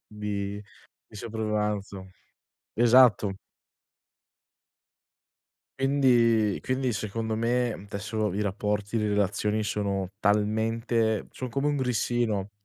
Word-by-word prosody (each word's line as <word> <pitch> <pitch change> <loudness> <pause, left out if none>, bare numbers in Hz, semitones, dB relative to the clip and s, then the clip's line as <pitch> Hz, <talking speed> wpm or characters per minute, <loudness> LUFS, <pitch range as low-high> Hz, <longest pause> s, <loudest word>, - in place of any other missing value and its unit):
di 105 -1 -4 0.5
di - - -13
sopravvivenza. 105 -3 -3 0.7
Esatto. 120 -4 +5 2.5
Quindi 120 -6 +3
quindi 130 -1 -1
secondo 110 +2 -3
me 120 -2 -1
desso 105 0 -2
i 100 - -2
rapporti, 105 +2 -1
le 105 - 0
relazioni 105 +1 0
sono 100 -3 -2
talmente 110 +1 +1
son 130 - -6
come 135 +5 -1
un 145 - 0
grissino 120 -5 0
110 Hz, 90 wpm, -27 LUFS, 105-115 Hz, 2.5 s, Esatto